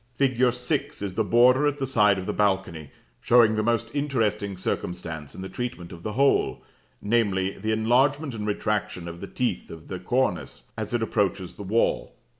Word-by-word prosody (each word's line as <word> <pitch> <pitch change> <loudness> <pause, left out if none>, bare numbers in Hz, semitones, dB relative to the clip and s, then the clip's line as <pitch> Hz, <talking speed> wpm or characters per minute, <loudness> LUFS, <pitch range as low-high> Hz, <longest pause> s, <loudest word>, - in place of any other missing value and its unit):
Fig. 130 -1 +3
6 125 0 -3
is 100 -2 -3
the - - +1
border 125 +4 +5
at 145 -1 0
the 135 - -1
side 105 -6 +3
of 95 - -4
the - - -2
balcony, 95 -7 0 0.3
showing 115 -2 +5
the 110 - +1
most 115 +1 0
interesting 110 -9 -1
circumstance 80 -5 -4
in 95 - -7
the - - -4
treatment 120 -7 -5
of 85 -2 -10
the 105 +3 -4
whole, 140 +3 +2 0.4
namely, 100 -4 +1
the 110 +3 -1
enlargement 130 +6 +2
and 105 -2 -4
retraction 105 -4 -2
of 85 0 -8
the 100 - -6
teeth 125 +4 -2
of 80 -1 -11
the 95 - -4
cornice, 105 - -2
as - - -5
it 115 - 0
approaches 100 -4 -1
the - - -11
wall. 105 +4 0
110 Hz, 185 wpm, -25 LUFS, 95-125 Hz, 0.4 s, border